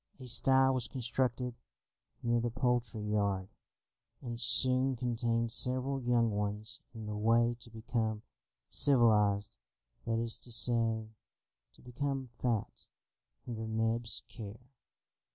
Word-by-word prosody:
A 130 - -9
sty 130 +2 +5
was 130 -3 -1
constructed 125 0 -2 0.7
near 120 0 +1
the 120 +1 -1
poultry 120 -3 -1
yard, 100 -3 -1 0.7
and 120 -3 -6
soon 130 +3 +5
contained 115 -1 -1
several 130 +3 +1
young 120 -2 +1
ones 105 +1 -3 0.2
in 110 -1 -7
the 105 0 -5
way 115 +2 +2
to 115 - -10
become 110 -1 -3 0.4
civilised, 105 -6 +3 0.5
that 115 0 0
is 115 0 -1
to 120 - -7
say, 115 -2 +3 0.6
to - - -22
become 135 +1 -4
fat 115 -4 -3 0.6
under 110 -2 -5
Neb's 115 +1 0
care. 115 +3 -11
115 Hz, 115 wpm, -32 LUFS, 110-125 Hz, 0.7 s, sty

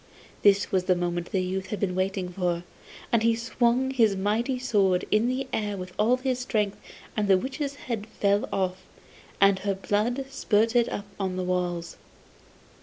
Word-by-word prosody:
This 200 -1 +4
was 185 -1 +1
the 185 - +3
moment 175 -1 -2
the 190 -2 +1
youth 185 +1 -3
was 195 -3 0
waiting 185 0 -1
for, 175 -1 -1 0.5
and 235 - +3
he 230 0 +3
swung 235 +3 +1
his 225 -6 +3
mighty 220 +7 0
sword 200 -7 +2
in 215 +3 +3
the 255 +2 -1
air 205 -2 -1
with 185 -1 -7
all 235 +4 +4
his 255 -1 -1
strength 210 -5 -1 0.4
and 210 -2 0
the 190 -1 +6
witch's 275 - -3
head 230 -6 -5
fell 200 -2 +1
off, 185 -1 -1 0.6
and 195 -1 +5
her 200 0 -1
blood 215 +7 0
spurted 230 -2 +2
up 205 - -4
on 190 -2 -1
the 185 - -2
walls. 175 -2 -2
205 Hz, 170 wpm, -26 LUFS, 185-235 Hz, 0.6 s, the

